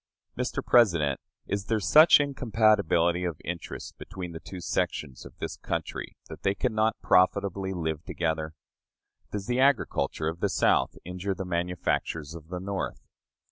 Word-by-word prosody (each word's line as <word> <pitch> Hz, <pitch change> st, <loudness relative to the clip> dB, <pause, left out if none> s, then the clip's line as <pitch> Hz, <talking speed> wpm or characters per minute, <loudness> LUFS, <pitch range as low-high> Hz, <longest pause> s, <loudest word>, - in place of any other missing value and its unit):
Mr. -, -, -3 dB
President, 85 Hz, -, +4 dB, 0.2 s
is 100 Hz, -1 st, -2 dB
there 110 Hz, +1 st, +1 dB
such 155 Hz, -, +7 dB
incompatibility 110 Hz, -, +2 dB
of 85 Hz, -4 st, -3 dB
interest 85 Hz, 0 st, -6 dB
between 95 Hz, -3 st, -7 dB
the 80 Hz, -, -7 dB
two 95 Hz, -, -9 dB
sections 75 Hz, -4 st, -2 dB
of -, -, -18 dB
this -, -, -5 dB
country -, -, -4 dB
that -, -, -10 dB
they 95 Hz, 0 st, +1 dB
can 125 Hz, +1 st, -1 dB
not 110 Hz, +1 st, +1 dB
profitably 95 Hz, +1 st, +2 dB
live 80 Hz, -3 st, -3 dB
together? 80 Hz, -1 st, -2 dB, 0.8 s
Does 100 Hz, -2 st, -4 dB
the 125 Hz, +3 st, 0 dB
agriculture 130 Hz, -, +2 dB
of 80 Hz, +1 st, -3 dB
the -, -, +1 dB
South -, -, +2 dB
injure 90 Hz, +2 st, -3 dB
the 95 Hz, -, -5 dB
manufactures 85 Hz, -3 st, -2 dB
of 80 Hz, -2 st, -10 dB
the 90 Hz, +1 st, -5 dB
North? 95 Hz, +1 st, -4 dB
90 Hz, 150 wpm, -28 LUFS, 85-105 Hz, 0.8 s, such